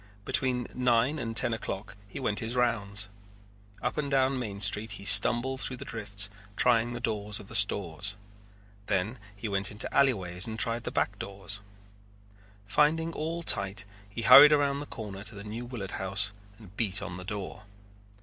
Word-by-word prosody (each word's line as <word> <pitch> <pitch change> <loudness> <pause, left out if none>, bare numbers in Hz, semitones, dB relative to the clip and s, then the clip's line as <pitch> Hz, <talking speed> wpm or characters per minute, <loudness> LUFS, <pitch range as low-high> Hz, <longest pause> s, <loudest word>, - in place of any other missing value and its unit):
Between 125 -2 +1
nine 125 +4 +1
and 115 -2 -4
ten 120 - +3
o'clock 100 -2 -6
he 100 - -8
went 105 -6 -1
his 115 +2 -3
rounds. 105 -4 0 0.8
Up 125 - -2
and 145 -2 -2
down 135 -1 +2
Main 105 -5 -5
Street 105 +2 +2
he 100 -1 -9
stumbled 120 +7 +5
through 130 - 0
the - - -8
drifts 105 -3 0 0.3
trying 120 0 +2
the 120 - -5
doors 105 -3 -2
of 100 - -13
the - - -5
stores. 100 0 +3 0.7
Then 100 +6 -1 0.2
he 100 +3 -6
went 100 -1 0
into 105 - -1
alleyways 95 -9 +1
and 110 0 -5
tried 115 +1 -1
the - - -3
back - - -1
doors. 100 0 -4 1.0
Finding 160 +9 +1
all 165 +2 -4
tight 100 -6 0 0.2
he 115 +4 -6
hurried 145 +7 +10
around 140 -1 +2
the 145 - -7
corner 100 -3 -8
to 105 +1 -6
the 100 - -8
New 110 +3 -6
Willard 110 -7 -6
House 95 +1 -1 0.3
and 100 -4 -16
beat 105 -3 0
on 90 - -6
the 90 - -8
door. 100 +1 -6
110 Hz, 175 wpm, -28 LUFS, 100-125 Hz, 1.0 s, hurried